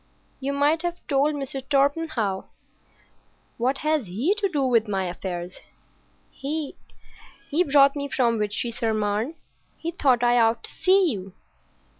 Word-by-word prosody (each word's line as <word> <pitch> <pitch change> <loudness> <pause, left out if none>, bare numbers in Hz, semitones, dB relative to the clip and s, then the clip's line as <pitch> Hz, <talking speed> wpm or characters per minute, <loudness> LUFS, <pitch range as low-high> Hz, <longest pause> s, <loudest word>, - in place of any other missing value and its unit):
"You 275 +1 -2
might 290 +3 +2
have 345 0 -2
told 290 +1 +2
Mr. 275 -1 -4
Torpenhow." 275 -8 +1 1.1
"What 255 +4 +1
has 305 -7 +1
he 235 - +1
to 400 -2 +1
do 295 -6 0
with 230 -3 +3
my 195 -2 -1
affairs?" 180 0 -5 0.7
"He—he 285 +1 -5
brought 280 -1 +5
me 285 -1 -3
from 240 -6 +1
Vitry 210 +3 -2
sur 225 -1 -1
Marne. 215 +7 -1 0.4
He 335 - -4
thought 260 -8 +2
I 240 0 +4
ought 225 0 +2
to - - -6
see 375 -2 +3
you." 190 -4 -6
270 Hz, 140 wpm, -25 LUFS, 220-295 Hz, 1.1 s, brought